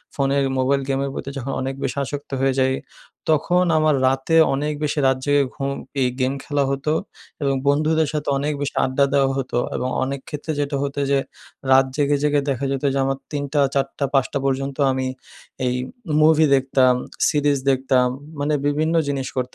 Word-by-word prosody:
ফোনের 140 Hz, 0 st, +1 dB
মোবাইল 135 Hz, +2 st, +2 dB
গেমের 135 Hz, 0 st, 0 dB
প্রতি 135 Hz, -, -5 dB
যখন 135 Hz, +1 st, -4 dB
অনেক 135 Hz, +1 st, -3 dB
বেশি -, -, -2 dB
আসক্ত 145 Hz, +1 st, -7 dB
হয়ে 135 Hz, 0 st, +2 dB
যাই, 130 Hz, 0 st, +3 dB, 0.6 s
তখন 175 Hz, +4 st, +3 dB
আমার 155 Hz, -1 st, +3 dB
রাতে 135 Hz, +5 st, +1 dB, 0.2 s
অনেক 150 Hz, +2 st, -1 dB
বেশি 150 Hz, 0 st, 0 dB
রাত 130 Hz, 0 st, +2 dB
জেগে 145 Hz, -1 st, +3 dB
ঘুম 140 Hz, -1 st, -2 dB, 0.3 s
এই 130 Hz, -, +3 dB
গেম 130 Hz, +1 st, +1 dB
খেলা 145 Hz, -1 st, 0 dB
হতো 140 Hz, +3 st, -1 dB, 0.5 s
এবং 140 Hz, -1 st, +1 dB
বন্ধুদের 155 Hz, +2 st, +2 dB
সাথে 150 Hz, -1 st, -2 dB
অনেক 145 Hz, +2 st, -1 dB
বেশি 145 Hz, -, -3 dB
আড্ডা 135 Hz, +1 st, +2 dB
দেওয়া 135 Hz, -1 st, +3 dB
হতো। 130 Hz, -2 st, -2 dB, 0.2 s
এবং 125 Hz, -, -1 dB
অনেক 140 Hz, +1 st, -3 dB
ক্ষেত্রে 150 Hz, +2 st, -4 dB
যেটা 145 Hz, 0 st, -1 dB
হতো 140 Hz, 0 st, -3 dB
যে 140 Hz, -, +4 dB, 0.5 s
রাত 135 Hz, 0 st, +6 dB
জেগে, 145 Hz, -1 st, +2 dB
জেগে 145 Hz, -1 st, +2 dB
দেখা 135 Hz, +1 st, -1 dB
যেতো 135 Hz, +1 st, -2 dB
যে -, -, -1 dB
আমার 135 Hz, 0 st, -1 dB
৩ঃ০০ 145 Hz, 0 st, -2 dB
৪ঃ০০ 140 Hz, +1 st, -1 dB
৫ঃ০০ 135 Hz, 0 st, +1 dB
পর্যন্ত 135 Hz, 0 st, -1 dB
আমি 130 Hz, 0 st, -1 dB, 0.6 s
এই 125 Hz, -, +1 dB, 0.5 s
মুভি 155 Hz, 0 st, +5 dB
দেখতাম, 130 Hz, -1 st, +3 dB, 0.3 s
সিরিজ 145 Hz, -2 st, +2 dB
দেখতাম। 130 Hz, -1 st, +2 dB, 0.3 s
মানে 145 Hz, +2 st, 0 dB
বিভিন্ন 155 Hz, +3 st, +1 dB
জিনিস 135 Hz, -2 st, -2 dB
করতাম। 130 Hz, -, +2 dB
140 Hz, 175 wpm, -22 LUFS, 135-145 Hz, 0.6 s, রাত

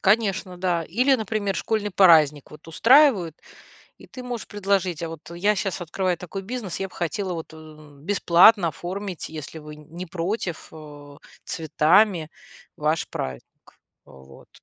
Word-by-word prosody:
Конечно, 195 Hz, -3 st, +1 dB
да. 175 Hz, -2 st, -1 dB
Или, 250 Hz, -, +2 dB
например, 215 Hz, -4 st, -2 dB
школьный 210 Hz, -2 st, -2 dB
праздник 155 Hz, -7 st, +4 dB
вот 150 Hz, +2 st, -14 dB
устраивают, 220 Hz, -, +4 dB, 0.6 s
и -, -, -15 dB
ты 255 Hz, -, -10 dB
можешь 245 Hz, -2 st, -6 dB
предложить: 195 Hz, -4 st, -1 dB
"А 165 Hz, -, -3 dB
вот 165 Hz, 0 st, -10 dB
я 205 Hz, +5 st, +1 dB
щас 195 Hz, -1 st, -3 dB
открываю 180 Hz, +1 st, -2 dB
такой 195 Hz, +2 st, -7 dB
бизнес, 210 Hz, -4 st, -5 dB
я 195 Hz, -, -3 dB
б -, -, -20 dB
хотела 180 Hz, +2 st, -3 dB
вот, 165 Hz, -1 st, -7 dB
э, 155 Hz, -2 st, -15 dB
бесплатно 185 Hz, +1 st, +5 dB
оформить, 180 Hz, +3 st, -5 dB
если 155 Hz, 0 st, -8 dB
вы 150 Hz, 0 st, -11 dB
не 165 Hz, +4 st, -9 dB
против, 180 Hz, 0 st, -4 dB
э, 145 Hz, -2 st, -12 dB, 0.3 s
цветами 160 Hz, +2 st, +2 dB, 0.5 s
ваш 155 Hz, +2 st, -1 dB
праздник, 65 Hz, -, -5 dB, 0.6 s
э, -, -, -19 dB
вот". 65 Hz, 0 st, -16 dB
180 Hz, 150 wpm, -23 LUFS, 155-200 Hz, 0.6 s, бесплатно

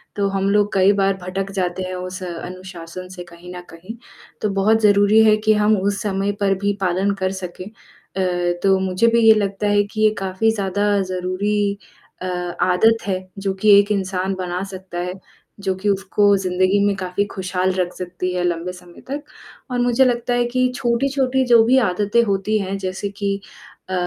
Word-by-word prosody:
तो 200 Hz, -1 st, 0 dB
हम 195 Hz, 0 st, 0 dB
लोग 205 Hz, 0 st, +2 dB
कई 195 Hz, +1 st, +5 dB
बार 195 Hz, 0 st, +2 dB
भटक 190 Hz, +2 st, -4 dB
जाते 185 Hz, -1 st, -2 dB
हैं 185 Hz, 0 st, -5 dB
उस 185 Hz, +1 st, -6 dB
अनुशासन 180 Hz, 0 st, -8 dB
से 180 Hz, -1 st, -8 dB
कहीं 175 Hz, +1 st, -12 dB
न 180 Hz, -, -7 dB
कहीं। 185 Hz, +8 st, -10 dB, 0.5 s
तो 210 Hz, -, 0 dB
बहुत 220 Hz, +3 st, +3 dB
ज़रूरी 205 Hz, +1 st, +5 dB
है 215 Hz, -1 st, +5 dB
कि 215 Hz, -, +5 dB
हम 210 Hz, 0 st, +3 dB
उस 200 Hz, +1 st, -1 dB
समय 200 Hz, -1 st, -1 dB
पर 195 Hz, -1 st, +2 dB
भी 205 Hz, 0 st, +2 dB
पालन 185 Hz, +2 st, +1 dB
कर 185 Hz, -, +1 dB
सकें। 180 Hz, +1 st, -7 dB
अ, 180 Hz, -4 st, -4 dB
तो 195 Hz, -1 st, +4 dB
मुझे 190 Hz, +4 st, +1 dB
भी 235 Hz, 0 st, +3 dB
ये 220 Hz, -, +9 dB
लगता 205 Hz, -1 st, -1 dB
है 205 Hz, 0 st, +3 dB
कि 215 Hz, +2 st, -6 dB
ये 215 Hz, -, +6 dB
काफ़ी 195 Hz, +3 st, 0 dB
ज़्यादा 205 Hz, 0 st, 0 dB
ज़रूरी 200 Hz, +2 st, -1 dB, 0.4 s
अ, -, -, -4 dB, 0.4 s
आदत 220 Hz, +5 st, +4 dB
है, 185 Hz, -1 st, 0 dB, 0.2 s
जो 195 Hz, -1 st, -1 dB
कि 195 Hz, +3 st, 0 dB
एक 205 Hz, +1 st, +1 dB
इंसान 190 Hz, -1 st, -1 dB
बना 180 Hz, -1 st, -4 dB
सकता 185 Hz, -2 st, -8 dB
है, 180 Hz, +1 st, -3 dB, 0.5 s
जो 190 Hz, -1 st, -1 dB
कि 195 Hz, +3 st, -2 dB
उसको 200 Hz, +1 st, +1 dB
ज़िंदगी 185 Hz, +1 st, +1 dB
में 200 Hz, -1 st, +1 dB
काफ़ी 190 Hz, +1 st, -2 dB
खुशहाल 185 Hz, 0 st, -1 dB
रख 180 Hz, -1 st, -1 dB
सकती 180 Hz, 0 st, -4 dB
है 180 Hz, -1 st, -1 dB
लंबे 175 Hz, +1 st, -1 dB
समय 180 Hz, -1 st, -15 dB
तक 290 Hz, +2 st, -4 dB, 0.5 s
और 245 Hz, -, -1 dB
मुझे 245 Hz, +2 st, +3 dB
लगता 245 Hz, 0 st, 0 dB
है 245 Hz, 0 st, +2 dB
कि 255 Hz, 0 st, +3 dB
छोटी-छोटी 260 Hz, +2 st, 0 dB
जो 235 Hz, -2 st, +6 dB
भी 255 Hz, +3 st, +4 dB
आदतें 205 Hz, +5 st, +1 dB
होती 200 Hz, +1 st, 0 dB
हैं, 195 Hz, 0 st, -3 dB
जैसे 190 Hz, +1 st, -4 dB
कि 200 Hz, -1 st, -1 dB, 0.5 s
अ, 185 Hz, -, -4 dB
195 Hz, 190 wpm, -20 LUFS, 185-210 Hz, 0.5 s, ये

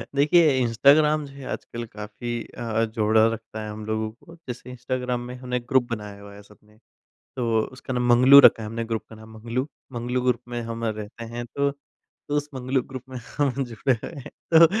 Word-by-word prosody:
देखिए 150 Hz, 0 st, +5 dB
इंस्टाग्राम 145 Hz, +6 st, +4 dB
जो 140 Hz, -, -12 dB
है, 140 Hz, -1 st, -10 dB
आजकल 120 Hz, 0 st, -5 dB
काफ़ी 110 Hz, +2 st, -6 dB, 0.2 s
अ -, -, -7 dB
अ, 115 Hz, -1 st, 0 dB
जोड़ा 110 Hz, 0 st, +3 dB
रखता 110 Hz, -1 st, -7 dB
है 105 Hz, -, -5 dB
हम 105 Hz, 0 st, -7 dB
लोगों 110 Hz, 0 st, -1 dB
को। 165 Hz, +9 st, -16 dB
जैसे 125 Hz, 0 st, -7 dB
इंस्टाग्राम 125 Hz, 0 st, -2 dB
में 125 Hz, +1 st, -7 dB
हमने 125 Hz, 0 st, -3 dB
ग्रुप 125 Hz, +1 st, +2 dB
बनाया 105 Hz, -3 st, -5 dB
हुआ 100 Hz, 0 st, -11 dB
है 100 Hz, -, -12 dB
सबने। 105 Hz, +1 st, -22 dB, 0.6 s
तो 115 Hz, -3 st, +1 dB, 0.2 s
उसका 130 Hz, -, -6 dB
नाम 125 Hz, 0 st, 0 dB
मंगलू 125 Hz, +3 st, +8 dB
रखा 115 Hz, -, +6 dB
है -, -, -5 dB
हमने 115 Hz, +1 st, -3 dB
ग्रुप 115 Hz, -1 st, -3 dB
का 110 Hz, -, -12 dB
नाम 110 Hz, +1 st, -13 dB
मंगलू। 115 Hz, +4 st, -3 dB, 0.3 s
मंगलू 125 Hz, +1 st, -2 dB
ग्रुप 125 Hz, -2 st, +2 dB
में 120 Hz, 0 st, -3 dB
हम 115 Hz, 0 st, -4 dB
रहते 110 Hz, +1 st, -4 dB
हैं 120 Hz, 0 st, -3 dB
तो, 140 Hz, +4 st, 0 dB
तो 140 Hz, +1 st, -9 dB
उस 145 Hz, 0 st, -1 dB
मंगलू 130 Hz, 0 st, 0 dB
ग्रुप 130 Hz, 0 st, -8 dB
में 130 Hz, -, -8 dB, 0.2 s
हम 145 Hz, -3 st, +2 dB
जुड़े 120 Hz, +2 st, 0 dB
हुए -, -, -6 dB
हैं -, -, -10 dB, 0.2 s
तो 165 Hz, +1 st, +10 dB
120 Hz, 205 wpm, -25 LUFS, 110-130 Hz, 0.6 s, तो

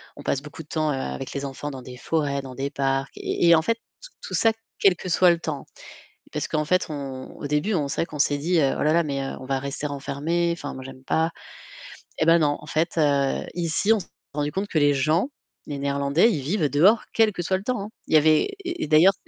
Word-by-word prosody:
on -, -, -11 dB
passe 135 Hz, -, 0 dB
beaucoup 150 Hz, +2 st, -9 dB
de -, -, -26 dB
temps 155 Hz, -1 st, 0 dB
avec 65 Hz, -, -3 dB
les 140 Hz, -, -3 dB
enfants 140 Hz, +1 st, -5 dB
dans 130 Hz, -1 st, -7 dB
des 125 Hz, 0 st, -10 dB
forêts, 140 Hz, -1 st, -1 dB
dans 130 Hz, -2 st, -9 dB
des 135 Hz, +2 st, -2 dB
parcs 135 Hz, -1 st, -1 dB
et 170 Hz, -1 st, +3 dB
en 160 Hz, -, +4 dB
fait, 230 Hz, +8 st, 0 dB, 0.4 s
tout -, -, -8 dB
ça 225 Hz, -1 st, +3 dB, 0.3 s
quel 190 Hz, -3 st, +5 dB
que 185 Hz, -, -7 dB
soit 175 Hz, +1 st, +5 dB
le 170 Hz, -, 0 dB
temps. 150 Hz, -4 st, -4 dB, 0.7 s
Parce -, -, -2 dB
qu'en 155 Hz, 0 st, 0 dB
fait 185 Hz, +4 st, +2 dB
on 135 Hz, -3 st, -6 dB
au 145 Hz, -, -5 dB
début 150 Hz, +9 st, 0 dB, 0.2 s
c'est -, -, -4 dB
vrai -, -, +1 dB
qu'on 150 Hz, -3 st, -9 dB
s'est 145 Hz, 0 st, +3 dB
dit: 165 Hz, +6 st, 0 dB
«Oh 140 Hz, -4 st, +2 dB
là 150 Hz, -, +3 dB
là, 170 Hz, 0 st, +4 dB
mais 140 Hz, -2 st, -2 dB, 0.2 s
on 130 Hz, -, -9 dB
va 135 Hz, 0 st, -1 dB
rester 140 Hz, +2 st, -4 dB
enfermés, 145 Hz, +5 st, -1 dB
enfin 165 Hz, -4 st, -5 dB
moi 130 Hz, -, -8 dB
j'aime 130 Hz, 0 st, -11 dB
pas». 160 Hz, +1 st, +1 dB, 0.9 s
Eh -, -, +1 dB
bah 165 Hz, +1 st, +6 dB
non 145 Hz, -2 st, +2 dB
en -, -, -12 dB
fait, 160 Hz, +3 st, -1 dB
heu, 140 Hz, -3 st, +2 dB
ici 175 Hz, +5 st, +2 dB
on 220 Hz, -, +1 dB
s'est 180 Hz, -, -9 dB, 0.3 s
rendu 145 Hz, 0 st, -1 dB
compte 195 Hz, +4 st, -2 dB
que 160 Hz, -, +1 dB
les 145 Hz, -1 st, +4 dB
gens, 155 Hz, -, +2 dB, 0.4 s
les 145 Hz, -2 st, -4 dB
néerlandais, 140 Hz, +8 st, +2 dB
ils 150 Hz, -, -1 dB
vivent 155 Hz, +2 st, 0 dB
dehors 180 Hz, -, +5 dB
quel 220 Hz, -1 st, +4 dB
que 175 Hz, -, -4 dB
soit 190 Hz, +2 st, +1 dB
le 190 Hz, -, -9 dB
temps, 250 Hz, -1 st, -1 dB
hein. 205 Hz, -, -6 dB, 0.2 s
Il -, -, +2 dB
y -, -, +10 dB
avait 155 Hz, -, +4 dB, 0.2 s
et 350 Hz, -, -3 dB
d'ailleurs, 160 Hz, +6 st, +6 dB
150 Hz, 240 wpm, -24 LUFS, 140-170 Hz, 0.9 s, y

